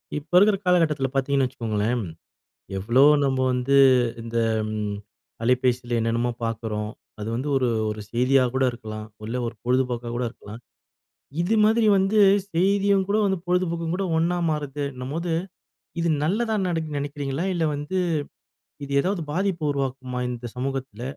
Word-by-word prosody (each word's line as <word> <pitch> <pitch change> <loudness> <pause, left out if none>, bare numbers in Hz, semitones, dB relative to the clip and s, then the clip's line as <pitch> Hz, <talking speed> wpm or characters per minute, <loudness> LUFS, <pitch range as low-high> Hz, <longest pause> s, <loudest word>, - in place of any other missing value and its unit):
இப்ப 150 +2 -6
இருக்கிற 200 +2 +5
காலகட்டத்தில 160 -6 +2
பாத்தீங்கன்னு 135 0 +1
வச்சுக்கோங்களேன், 115 -1 -1 0.7
எவ்ளோ 115 +7 +3 0.2
நம்ம 130 -1 +1
வந்து 125 +2 +1 0.5
இந்த 115 0 -6 0.3
ம் 105 -1 -3 0.5
அலைபேசில 125 0 +1
என்னென்னமோ 115 +2 0
பாக்குறோம். 110 -2 -3 0.3
அது 105 - -4
வந்து 130 +5 -2
ஒரு, 130 -2 +2 0.2
ஒரு 105 0 -5
செய்தியா 125 +2 +3
கூட 130 0 +2
இருக்கலாம். 110 -2 -7 0.2
இல்ல 115 +3 -3
ஒரு 115 - -5
பொழுதுபோக்காக 125 -1 0
கூட 125 +1 -1
இருக்கலாம். 110 -1 -11 0.8
இது 190 +6 +1
மாதிரி 220 +1 +3
வந்து 195 +3 +2 0.4
செய்தியும் 195 +2 +2
கூட 205 - +2
வந்து 190 -1 0
பொழுதுபோக்கும் 170 -2 0
கூட 195 - -1
ஒன்னா 175 +2 +1
மாறுதுன்னபோது. 145 +2 -3 0.7
இது 170 - +1 0.2
நல்லதா 220 +7 0
நடக்குன்னு 160 -4 -2
நெனைக்கிறீங்களா, 145 +2 -3
இல்ல 170 -2 0
வந்து 145 +6 -4 0.9
இது 140 - -7
ஏதாவது 190 +2 -1
பாதிப்பு 180 0 -1
உருவாக்குமா 130 -2 -3
இந்த 120 0 -5
சமூகத்துல, 130 -3 -4
135 Hz, 135 wpm, -24 LUFS, 120-170 Hz, 0.9 s, இருக்கிற